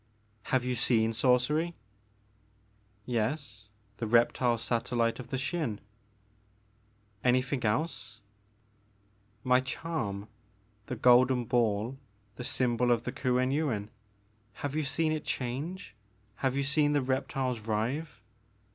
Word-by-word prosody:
Have 130 -1 +1
you 125 - 0
seen 115 -2 +2
sorcery? 130 +8 +2 0.7
" 105 0 -37
Yes, 110 -4 -3 0.3
the 115 - -3
reptile 120 +1 +3
satellite 115 0 0
of 130 - -7
the 130 - -2
Xin 135 - -2 0.8
" 105 0 -37
Anything 130 +1 +2
else? 110 -2 -1 0.6
" 105 +1 -37
My 125 - +7
charm, 130 -7 -3 0.3
— 105 +1 -37
the 125 - -3
golden 125 +1 +5
ball, 115 +1 0 0.3
the 125 - -7
symbol 125 -1 +1
of 120 -1 +2
the - - -3
Kuen 130 0 +1
Yuin. 125 -9 -1 0.8
Have 145 0 -3
you 155 - +1
seen 155 +3 +1
it 155 -1 -2
change, 140 - -4 0.2
— 105 0 -37
have 130 -1 0
you 140 - +1
seen 145 +1 +2
the 145 -2 +2
reptiles 130 -3 -1
writhe 115 +3 -2
120 Hz, 130 wpm, -30 LUFS, 105-135 Hz, 0.8 s, My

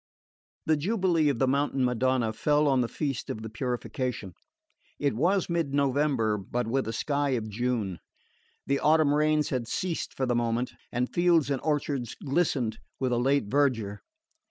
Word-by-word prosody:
The 155 -1 +3
jubilee 175 -3 +2
of 140 - 0
the 130 - +2
Mountain 135 -1 +1
Madonna 125 -2 +1
fell 150 +5 +2
on 135 -2 +3
the 120 - 0
feast 140 -1 -3
of 110 - -4
the 110 - -6
Purification. 125 - -3 0.6
It 140 -1 0
was 180 - +2
mid 165 -5 -1
November, 140 -6 +1
but 120 +5 -3
with 130 +3 -1
a - - -1
sky 140 +3 0
of 110 -1 -4
June. 110 -5 -2 0.7
The 140 0 +1
autumn 155 -1 +4
rains 150 0 +2
had 125 -4 -2
ceased 175 +6 -3
for 130 - +1
the 125 - +1
moment, 120 +1 0 0.2
and 125 +1 -2
fields 170 -5 +3
and 135 - -1
orchards 145 -5 -1
glistened 135 -7 0 0.2
with 130 -2 0
a 120 - +2
late 135 0 +2
verdure. 115 -5 0
135 Hz, 165 wpm, -28 LUFS, 120-150 Hz, 0.7 s, autumn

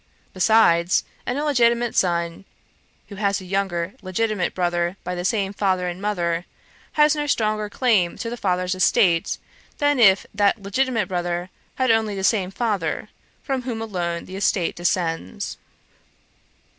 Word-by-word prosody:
Besides, 180 -3 +4 0.2
an 245 - -1
illegitimate 240 -5 +2
son, 170 -1 0 0.7
who 200 - -9
has 200 -1 +1
a 190 - -10
younger 185 -1 -1
legitimate 195 0 -1
brother 175 0 0
by 180 - -3
the 175 0 -4
same 195 0 0
father 190 -3 0
and 175 +1 -5
mother, 175 -4 -1 0.5
has 300 0 +4
no 295 -1 -2
stronger 215 -5 0
claim 205 -7 +1
to 235 - -4
the 235 - -3
father's 180 -4 0
estate, 180 -2 +2 0.4
than 290 -2 +2
if 195 -4 +6
that 205 +1 +2
legitimate 225 +1 0
brother 175 0 -3 0.2
had 260 -2 +2
only 220 -2 +1
the 190 - -4
same 190 -2 +2
father, 195 -6 -2 0.3
from 270 -2 -2
whom 240 -3 -4
alone 175 -6 -3
the 185 - -9
estate 190 -3 0
descends. 165 - -2
195 Hz, 145 wpm, -23 LUFS, 175-225 Hz, 0.7 s, if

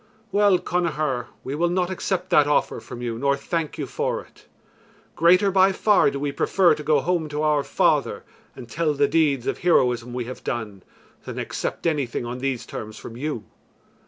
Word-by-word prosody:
"Well, 200 -1 +4
Connachar, 155 -9 -1 0.2
we 135 - -4
will 170 +4 +1
not 180 +1 0
accept 185 0 -2
that 145 -1 +5
offer 150 - +1
from 120 - -9
you 115 -1 -3
nor 140 +1 +2
thank 160 +2 -3
you - - -3
for - - -2
it. - - -21 0.7
Greater 180 +4 +4
by 190 0 +5
far 200 -2 +3
do 140 - -4
we 145 0 -1
prefer 180 +5 +3
to 150 - -5
go 150 -2 +2
home 170 -2 -1
to 150 +1 -2
our 150 -2 +2
father - - +1 0.3
and 120 - -10
tell 150 +3 -1
the 145 0 +3
deeds 145 -6 +2
of - - -2
heroism 125 -8 +2
we 125 -1 -3
have 130 +2 -8
done, 105 -5 -4 0.4
than - - -7
accept - - -4
anything 140 -7 -1
on 120 +1 -5
these 130 -2 -2
terms 110 0 -7
from 115 - -9
you. 130 -3 -4
150 Hz, 190 wpm, -23 LUFS, 125-175 Hz, 0.7 s, that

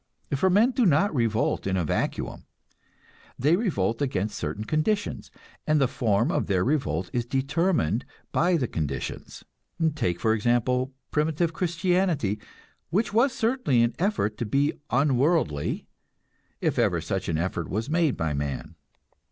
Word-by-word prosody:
For 190 +8 +2
men 210 +7 +4
do 255 -1 +1
not 170 +5 +3
revolt 115 -6 0
in 95 -1 +1
a 90 - 0
vacuum, - - -2 0.9
they 150 +6 +3
revolt 115 - 0
against 110 -7 -1
certain 105 - -3
conditions, 155 - -1 0.4
and 155 0 +3
the 135 - +3
form 115 -3 +1
of - - 0
their 95 -2 +2
revolt 90 - -1
is 120 - 0
determined 135 - 0 0.3
by 175 +1 +3
the 130 -6 -1
conditions. 70 -7 -4 0.5
Take, 90 - -1
for 110 - +2
example, 120 +3 +1 0.2
primitive 160 +2 +1
Christianity, 170 - 0 0.5
which 200 +7 0
was 245 +5 +4
certainly 225 - +2
an 120 0 +1
effort 175 - 0
to 120 - -1
be 140 +6 +2 0.2
unworldly, 135 - +1 0.8
if - - 0
ever - - +2
such - - -3
an 80 - 0
effort 90 +3 -2
was 110 +4 -2
made 160 -2 +1
by 80 -2 -1
man. 70 -1 -4
135 Hz, 145 wpm, -26 LUFS, 105-170 Hz, 0.9 s, men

